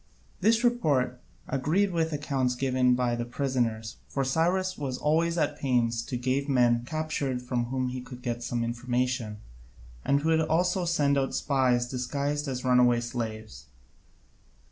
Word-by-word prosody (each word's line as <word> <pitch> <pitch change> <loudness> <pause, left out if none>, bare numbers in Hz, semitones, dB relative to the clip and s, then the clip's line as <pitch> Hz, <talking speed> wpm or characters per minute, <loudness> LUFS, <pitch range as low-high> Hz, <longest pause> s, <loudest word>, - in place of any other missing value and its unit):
This 225 +4 +3
report 140 - +1 0.3
agreed 165 +9 +1
with 165 -2 0
the 155 - -3
accounts 135 -4 -1
given 125 -1 +2
by 125 -1 0
the 120 - -2
prisoners, 120 -3 -2
for 135 - -1
Cyrus 175 +7 +1
was 135 -3 -3
always 165 +4 +1
at 150 -3 0
pains 120 -4 +1
to 130 - -3
gave 130 +3 -1
men 120 -3 +3
captured 155 -4 -2
from 125 -1 -1
whom 130 +1 -2
he 125 0 -5
could 125 0 -11
get 120 -1 -2
some 120 0 -2
information, 120 -1 -2 0.7
and 140 +1 +2
he - - -6
would 160 0 +3
also 175 +3 +1
send 145 -5 +2
out 135 - -1
spies 125 -4 +2
disguised 140 +4 -2
as 130 -1 -4
runaway 125 -1 +4
slaves. 110 - -5
130 Hz, 155 wpm, -28 LUFS, 120-150 Hz, 0.7 s, runaway